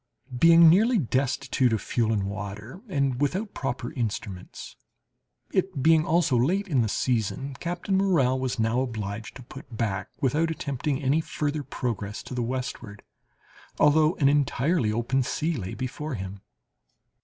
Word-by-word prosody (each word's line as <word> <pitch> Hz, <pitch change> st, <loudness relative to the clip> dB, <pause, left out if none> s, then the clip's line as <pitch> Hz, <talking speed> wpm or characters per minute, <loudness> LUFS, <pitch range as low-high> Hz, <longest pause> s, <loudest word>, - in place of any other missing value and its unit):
Being 165 Hz, +5 st, +7 dB
nearly 220 Hz, +9 st, +5 dB
destitute 130 Hz, -, 0 dB
of 110 Hz, -, +1 dB
fuel 115 Hz, +2 st, 0 dB
and 105 Hz, -3 st, 0 dB
water, 105 Hz, -, -6 dB
and 140 Hz, -, 0 dB
without 190 Hz, +9 st, -1 dB
proper 125 Hz, -3 st, -4 dB
instruments, 100 Hz, -6 st, -5 dB, 0.8 s
it 185 Hz, -7 st, -1 dB
being 160 Hz, 0 st, +4 dB
also 165 Hz, -4 st, +2 dB
late 180 Hz, +12 st, +1 dB
in 140 Hz, -8 st, +2 dB
the 110 Hz, -, 0 dB
season, 130 Hz, +5 st, -1 dB
Captain 175 Hz, +3 st, -2 dB
Morrell 150 Hz, -10 st, +2 dB
was 130 Hz, -1 st, -2 dB
now 115 Hz, +2 st, +1 dB
obliged 110 Hz, -4 st, -5 dB
to 130 Hz, -, -10 dB
put 130 Hz, -1 st, -11 dB
back, 105 Hz, -3 st, -2 dB
without 150 Hz, +5 st, +1 dB
attempting 140 Hz, -2 st, -3 dB
any 140 Hz, +5 st, +2 dB
further 155 Hz, -2 st, -2 dB
progress 115 Hz, -6 st, -4 dB
to -, -, -8 dB
the 125 Hz, -, -2 dB
westward, 120 Hz, -4 st, -5 dB, 0.8 s
although 155 Hz, +2 st, +4 dB
an 140 Hz, -, +2 dB
entirely 140 Hz, -2 st, +2 dB
open, 120 Hz, +4 st, 0 dB
sea 155 Hz, +6 st, -1 dB
lay 95 Hz, -7 st, -5 dB
before 135 Hz, +3 st, -4 dB
him. 95 Hz, -1 st, -7 dB
130 Hz, 145 wpm, -26 LUFS, 115-155 Hz, 0.8 s, Being